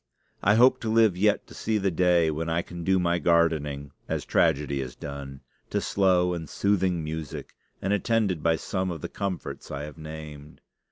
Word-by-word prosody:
I 105 Hz, +2 st, +4 dB
hope 130 Hz, +2 st, +5 dB
to 115 Hz, -, -2 dB
live 110 Hz, -4 st, +4 dB
yet 105 Hz, +3 st, +2 dB
to -, -, -14 dB
see 110 Hz, 0 st, -1 dB
the 100 Hz, -2 st, +1 dB
day 85 Hz, -1 st, +3 dB
when 80 Hz, +2 st, -3 dB
I 85 Hz, +1 st, 0 dB
can 85 Hz, -1 st, -8 dB
do 95 Hz, +2 st, +3 dB
my 85 Hz, -1 st, +1 dB
gardening, 75 Hz, -4 st, +1 dB, 0.2 s
as -, -, -2 dB
tragedy 70 Hz, -4 st, +1 dB
is 65 Hz, -2 st, -6 dB
done, 70 Hz, -1 st, -7 dB, 0.3 s
to -, -, 0 dB
slow 90 Hz, -2 st, +2 dB
and 80 Hz, -4 st, -5 dB
soothing 95 Hz, -4 st, +1 dB
music, 80 Hz, -1 st, -6 dB, 0.3 s
and 95 Hz, +2 st, +1 dB
attended 105 Hz, -5 st, +1 dB
by 80 Hz, 0 st, +3 dB
some 95 Hz, +3 st, -2 dB
of 85 Hz, -4 st, -5 dB
the -, -, -5 dB
comforts 100 Hz, -3 st, -5 dB
I 70 Hz, +1 st, -5 dB
have 75 Hz, +2 st, -9 dB
named. 75 Hz, -1 st, -9 dB
85 Hz, 185 wpm, -26 LUFS, 75-95 Hz, 0.3 s, hope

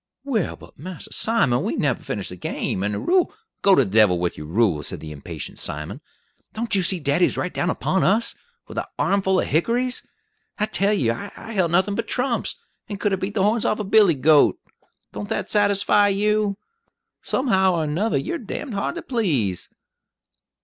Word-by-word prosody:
"Well, 240 Hz, -10 st, -1 dB
but -, -, -17 dB
Mass 180 Hz, +2 st, -7 dB
Simon, 140 Hz, -, +2 dB
we -, -, -2 dB
nebber 135 Hz, -5 st, 0 dB
finish 105 Hz, -2 st, -4 dB
de 90 Hz, -, -7 dB
game, 90 Hz, +1 st, -3 dB
and 105 Hz, +1 st, -1 dB
de 100 Hz, -, -2 dB
rule 365 Hz, -1 st, +2 dB, 0.2 s
" -, -, -57 dB
"Go 195 Hz, -1 st, +6 dB
to 135 Hz, -, +5 dB
the 95 Hz, -, -7 dB
devil 105 Hz, -4 st, +5 dB
with 85 Hz, 0 st, -1 dB
your 75 Hz, -, -8 dB
rule!" 90 Hz, -3 st, +2 dB
said -, -, -4 dB
the 80 Hz, -, -8 dB
impatient 70 Hz, -2 st, -7 dB
Simon. 75 Hz, +1 st, -5 dB, 0.5 s
"Don't 230 Hz, +1 st, -3 dB
you 195 Hz, -, +5 dB
see 180 Hz, +1 st, +1 dB
daddy's 145 Hz, +4 st, +1 dB
right 180 Hz, -, -2 dB
down 175 Hz, -, 0 dB
upon 190 Hz, -, 0 dB
us, 215 Hz, +5 st, +3 dB, 0.3 s
with -, -, -4 dB
an -, -, -3 dB
armful 190 Hz, -1 st, +2 dB
of -, -, 0 dB
hickories? 240 Hz, -, 0 dB, 0.6 s
I 210 Hz, -, +1 dB
tell 200 Hz, -1 st, +1 dB
you, 125 Hz, -, +2 dB
I 200 Hz, -, -9 dB
helt 185 Hz, -6 st, +1 dB
nothin' 190 Hz, +4 st, +2 dB
but -, -, -3 dB
trumps, 250 Hz, -1 st, -1 dB, 0.3 s
and 205 Hz, -2 st, -5 dB
could 205 Hz, -1 st, 0 dB
'a' -, -, +1 dB
beat 190 Hz, +2 st, -4 dB
the 195 Hz, -, +2 dB
horns 215 Hz, +2 st, +2 dB
off 215 Hz, -, +1 dB
a 215 Hz, -, -3 dB
billy 200 Hz, -4 st, +5 dB
goat. 150 Hz, +2 st, +4 dB, 0.6 s
Don't 205 Hz, -, -6 dB
that 225 Hz, -, -2 dB
satisfy 205 Hz, 0 st, +4 dB
you? 205 Hz, 0 st, +1 dB, 0.6 s
Somehow 190 Hz, -8 st, +2 dB
or 165 Hz, -, 0 dB
another, 170 Hz, +9 st, 0 dB
you're 340 Hz, 0 st, -3 dB
d 220 Hz, -, -6 dB
d 270 Hz, -, -8 dB
hard 200 Hz, -, -2 dB
to 340 Hz, -, -6 dB
please!" 145 Hz, -, -1 dB
190 Hz, 200 wpm, -23 LUFS, 140-215 Hz, 0.6 s, Go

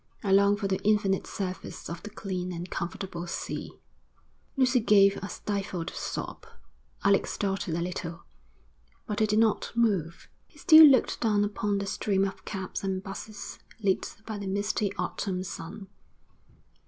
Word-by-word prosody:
I 195 Hz, -, 0 dB
long 200 Hz, +1 st, +5 dB
for 200 Hz, -, -2 dB
the 190 Hz, -1 st, -1 dB
infinite 205 Hz, -2 st, +2 dB
surface 185 Hz, -2 st, -5 dB
of 170 Hz, -, -6 dB
the 210 Hz, -, -8 dB
clean 185 Hz, -4 st, -4 dB
and 175 Hz, +1 st, -6 dB
comfortable 175 Hz, 0 st, -4 dB
sea.' -, -, -5 dB, 0.8 s
Lucy 255 Hz, -1 st, +4 dB
gave 200 Hz, -3 st, +5 dB
a 195 Hz, -, -6 dB
stifled 195 Hz, -5 st, -3 dB
sob. -, -, -5 dB, 0.6 s
Alec 200 Hz, 0 st, +4 dB
started 195 Hz, -4 st, -2 dB
a 170 Hz, -, -1 dB
little, 170 Hz, -1 st, -4 dB, 0.8 s
but 210 Hz, -2 st, -3 dB
he 215 Hz, -, +3 dB
did 210 Hz, 0 st, +1 dB
not 220 Hz, -1 st, +2 dB
move. 195 Hz, -8 st, 0 dB, 0.2 s
He -, -, -23 dB
still 315 Hz, -3 st, +9 dB
looked 270 Hz, -3 st, +3 dB
down 210 Hz, -3 st, +3 dB
upon 205 Hz, 0 st, -1 dB
the 200 Hz, -, -2 dB
stream 195 Hz, -1 st, +1 dB
of 195 Hz, -, -6 dB
cabs 190 Hz, -2 st, -5 dB
and 190 Hz, -1 st, -2 dB
'buses, 200 Hz, +1 st, -7 dB, 0.2 s
lit 195 Hz, -3 st, 0 dB
by 215 Hz, -2 st, -5 dB
the 200 Hz, -, -5 dB
misty 200 Hz, +1 st, 0 dB
autumn 185 Hz, -2 st, -2 dB
sun. 190 Hz, +2 st, -7 dB
200 Hz, 155 wpm, -28 LUFS, 185-210 Hz, 0.8 s, still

